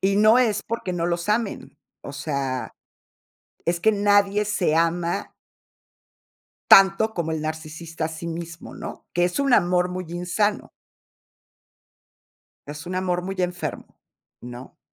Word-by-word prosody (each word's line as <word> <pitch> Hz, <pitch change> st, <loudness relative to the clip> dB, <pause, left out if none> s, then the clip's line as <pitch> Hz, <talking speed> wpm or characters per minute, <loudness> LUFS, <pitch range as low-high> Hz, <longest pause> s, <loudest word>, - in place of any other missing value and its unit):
Y 195 Hz, +1 st, +2 dB
no 215 Hz, +3 st, +6 dB
es 215 Hz, -5 st, +2 dB
porque 230 Hz, -5 st, -4 dB
no 170 Hz, -1 st, -1 dB
los 170 Hz, +2 st, -2 dB
amen, 215 Hz, 0 st, -1 dB, 0.3 s
o 140 Hz, -, -8 dB
sea, 140 Hz, -4 st, -3 dB, 0.9 s
es 170 Hz, 0 st, 0 dB
que 220 Hz, +5 st, +4 dB
nadie 205 Hz, 0 st, +3 dB
se 185 Hz, -6 st, +1 dB
ama 170 Hz, +1 st, 0 dB, 1.4 s
tanto 195 Hz, +3 st, +7 dB
como 160 Hz, -2 st, -2 dB
el 160 Hz, -, -2 dB
narcisista 160 Hz, +1 st, -5 dB
a -, -, -1 dB
sí 160 Hz, +1 st, -6 dB
mismo, 165 Hz, 0 st, -7 dB
¿no? -, -, -8 dB
Que 175 Hz, 0 st, +2 dB
es 180 Hz, +10 st, 0 dB
un 275 Hz, -2 st, +2 dB
amor 180 Hz, -1 st, +3 dB
muy 185 Hz, 0 st, -4 dB
insano. 180 Hz, +5 st, -1 dB, 2.0 s
Es 150 Hz, +3 st, -8 dB
un 180 Hz, -, -4 dB
amor 180 Hz, -1 st, 0 dB
muy 195 Hz, +1 st, -5 dB
enfermo, 180 Hz, 0 st, -4 dB, 0.4 s
¿no? 125 Hz, +1 st, -10 dB
175 Hz, 135 wpm, -24 LUFS, 165-200 Hz, 2.0 s, tanto